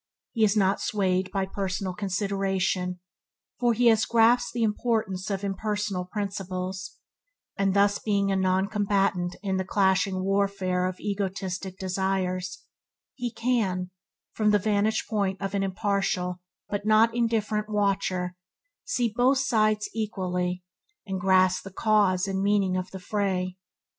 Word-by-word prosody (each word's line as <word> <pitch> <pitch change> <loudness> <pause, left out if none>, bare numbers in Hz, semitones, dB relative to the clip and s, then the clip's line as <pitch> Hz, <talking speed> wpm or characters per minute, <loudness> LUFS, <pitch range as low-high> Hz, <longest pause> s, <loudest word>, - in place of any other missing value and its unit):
He 225 -3 +1
is 215 0 +3
not 195 -1 +2
swayed 185 -2 0
by 195 -1 0
personal 190 -1 -3
consideration, 190 -2 -1 0.6
for 240 -1 +3
he 240 +2 +1
has 225 -1 +5
grasped 235 +1 +4
the 235 -1 -1
import 225 +1 +1 0.2
of 195 -1 -2
impersonal 200 -1 -2
principles, 185 -1 -4 0.6
and 195 0 +1
being - - -2
thus 200 0 +3
a 200 -1 +2
noncombatant 190 -1 +1
in 190 -2 0
the 190 - 0
clashing 190 0 +1
warfare 195 -2 +1
of 185 0 -5
egotistic 195 -2 -3
desires, 185 -1 -2 0.5
he 245 -2 -4
can, 195 -8 0 0.4
from 215 -1 +2
the 210 - +5
vantage 210 +1 +1
ground 200 -4 0
of 195 0 -4
an 200 - 0
impartial 195 -2 -1 0.3
but 205 0 -3
not 220 +2 +4
indifferent 220 -2 0
watcher, 195 -3 0 0.5
see 245 - -1
both 255 +3 +4
sides 215 -5 +2
equally, 180 -4 -2 0.4
and 190 -2 -3
grasp 185 0 +4
the 195 - -8
cause 200 -3 +2
and 190 0 -1
meaning 200 -2 +2
of 185 0 -2
the 190 - -8
fray. 185 -2 -1
195 Hz, 135 wpm, -26 LUFS, 185-210 Hz, 0.6 s, has